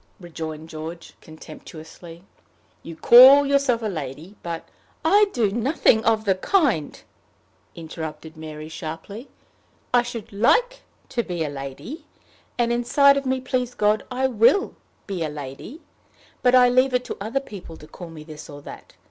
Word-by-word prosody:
rejoined 160 Hz, -3 st, -7 dB
George, 165 Hz, +1 st, -8 dB
contemptuously. 160 Hz, +2 st, -12 dB, 0.6 s
"You 165 Hz, -, -9 dB
call 260 Hz, -, +8 dB
yourself 275 Hz, -4 st, +1 dB
a -, -, -1 dB
lady, 155 Hz, +1 st, -7 dB
but 170 Hz, -1 st, -6 dB, 0.2 s
" -, -, -30 dB
"I 415 Hz, +1 st, +5 dB
do 220 Hz, -, 0 dB
nothing 235 Hz, -1 st, +2 dB
of 220 Hz, -1 st, +2 dB
the 195 Hz, -, +3 dB
kind," 225 Hz, -, 0 dB, 0.8 s
interrupted 160 Hz, -1 st, -8 dB
Mary, 155 Hz, -1 st, -8 dB
sharply. 165 Hz, -, -8 dB, 0.7 s
"I 245 Hz, -, +5 dB
should 230 Hz, -4 st, -8 dB
like 485 Hz, -, +2 dB, 0.3 s
to 240 Hz, -, -1 dB
be 175 Hz, -6 st, -4 dB
a 150 Hz, -, -3 dB
lady; 140 Hz, -, -8 dB, 0.5 s
and 235 Hz, -1 st, +1 dB
inside 280 Hz, +4 st, +4 dB
of 275 Hz, -1 st, -2 dB
me, 260 Hz, 0 st, 0 dB
please 250 Hz, -1 st, -2 dB
God, 210 Hz, +1 st, +1 dB
I 255 Hz, +1 st, -1 dB
will 255 Hz, -, +3 dB, 0.3 s
be 190 Hz, -5 st, -4 dB
a 155 Hz, -, -2 dB
lady; 150 Hz, -, -9 dB, 0.6 s
but 250 Hz, 0 st, +4 dB
I 250 Hz, -1 st, +7 dB
leave 255 Hz, +1 st, +3 dB
it 250 Hz, 0 st, 0 dB
to -, -, -6 dB
other 225 Hz, +6 st, -1 dB
people 195 Hz, -10 st, -10 dB
to 150 Hz, -, -13 dB
call 170 Hz, +2 st, -11 dB
me 160 Hz, -2 st, -11 dB
this 155 Hz, 0 st, -11 dB
or 145 Hz, -1 st, -9 dB
that. -, -, -12 dB
205 Hz, 155 wpm, -23 LUFS, 160-250 Hz, 0.8 s, call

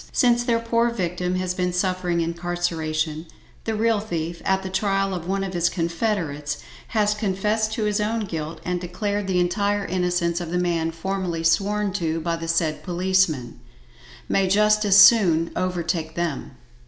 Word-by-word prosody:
Since 240 Hz, -2 st, +3 dB
their 235 Hz, -1 st, +2 dB
poor 230 Hz, +1 st, +1 dB
victim 180 Hz, -4 st, -2 dB
has 185 Hz, 0 st, -1 dB
been 180 Hz, 0 st, -1 dB
suffering 180 Hz, -1 st, 0 dB
incarceration, 165 Hz, -2 st, -2 dB, 0.4 s
the 225 Hz, -, -1 dB
real 225 Hz, 0 st, +2 dB
thief, 170 Hz, -5 st, -4 dB
at 190 Hz, 0 st, +1 dB
the 190 Hz, -, -4 dB
trial 195 Hz, 0 st, 0 dB
of 175 Hz, -2 st, -5 dB
one 195 Hz, +1 st, -1 dB
of 190 Hz, -1 st, -4 dB
his 175 Hz, -1 st, +2 dB
confederates, 165 Hz, -5 st, -2 dB, 0.3 s
has 210 Hz, -2 st, +1 dB
confessed 210 Hz, +1 st, -1 dB
to 220 Hz, -, -2 dB
his 210 Hz, 0 st, 0 dB
own 220 Hz, +2 st, 0 dB
guilt, 160 Hz, -4 st, -5 dB
and 180 Hz, 0 st, -1 dB
declared 200 Hz, +3 st, -3 dB
the 185 Hz, -2 st, +1 dB
entire 200 Hz, +3 st, 0 dB
innocence 180 Hz, -1 st, 0 dB
of 170 Hz, -, -5 dB
the 180 Hz, -, -1 dB
man 170 Hz, -2 st, 0 dB
formerly 175 Hz, 0 st, -3 dB
sworn 200 Hz, +4 st, +1 dB
to 165 Hz, -4 st, -1 dB
by 165 Hz, +1 st, -1 dB
the 165 Hz, 0 st, -6 dB
said 160 Hz, -2 st, 0 dB
policemen. 175 Hz, -9 st, 0 dB, 0.7 s
May 195 Hz, -1 st, +2 dB
justice 210 Hz, 0 st, +4 dB
soon 195 Hz, -6 st, +6 dB
overtake 170 Hz, -3 st, -2 dB
them. 160 Hz, -6 st, -3 dB
180 Hz, 160 wpm, -23 LUFS, 170-205 Hz, 0.7 s, soon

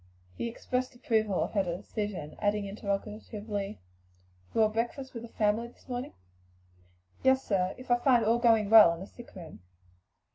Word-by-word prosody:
He -, -, -3 dB
expressed 250 Hz, +2 st, -3 dB
approval 220 Hz, -7 st, +1 dB
of -, -, -4 dB
her 200 Hz, -2 st, +2 dB
decision, 180 Hz, -2 st, -4 dB
adding 210 Hz, 0 st, 0 dB
interrogatively, 205 Hz, -, -4 dB, 0.7 s
"You -, -, +2 dB
will 215 Hz, -, +5 dB
breakfast 240 Hz, +4 st, -3 dB
with 230 Hz, -, -6 dB
the 235 Hz, -, -9 dB
family 215 Hz, +2 st, +1 dB
this 235 Hz, -, -21 dB
morning?" 250 Hz, +1 st, -4 dB, 1.1 s
"Yes, 265 Hz, 0 st, +4 dB
sir; 185 Hz, -2 st, 0 dB
if 255 Hz, -1 st, -8 dB
I 240 Hz, -, +6 dB
find 240 Hz, -3 st, +4 dB
all 230 Hz, +2 st, +3 dB
going 225 Hz, -3 st, +3 dB
well 215 Hz, -6 st, +10 dB
in -, -, -11 dB
the -, -, -5 dB
sick 240 Hz, +3 st, -14 dB
room." 170 Hz, -4 st, -10 dB
220 Hz, 160 wpm, -30 LUFS, 200-240 Hz, 1.1 s, well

